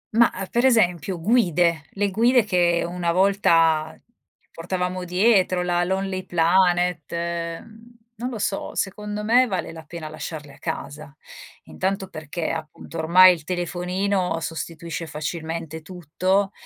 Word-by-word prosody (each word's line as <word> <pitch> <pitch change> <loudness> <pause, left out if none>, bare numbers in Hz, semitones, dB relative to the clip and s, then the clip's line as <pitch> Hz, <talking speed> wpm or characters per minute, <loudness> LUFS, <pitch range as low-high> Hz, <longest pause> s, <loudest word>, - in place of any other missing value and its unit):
Mah, 235 +1 +5 0.2
per 240 - +1
esempio, 180 - +2
guide, 175 -6 +2
le 200 0 0
guide 240 +4 +4
che 175 -4 +2
una 175 -1 -2
volta 165 -4 +3 0.5
portavamo 180 +1 -3
dietro, 185 -1 +3
la 175 0 +1
Lonely 190 0 -2
Planet, 175 -1 +2 0.5
mhmm, 230 +2 -17 0.2
non 245 +3 -3
lo 240 - -5
so 200 -1 -3
secondo 210 +1 -3
me 245 +4 +4
vale 190 -5 -3
la 160 -1 -10
pena 155 -1 -7
lasciarle 155 -2 -7
a - - -18
casa. 145 0 -6 0.5
Intanto 190 0 -3
perché, 155 +1 -4
appunto, 160 +1 -7
ormai 180 +3 +7
il 165 - -8
telefonino 180 +1 -1
sostituisce 165 0 -5
facilmente 160 +1 -5
tutto, 185 +3 -1
180 Hz, 125 wpm, -23 LUFS, 165-195 Hz, 0.5 s, ormai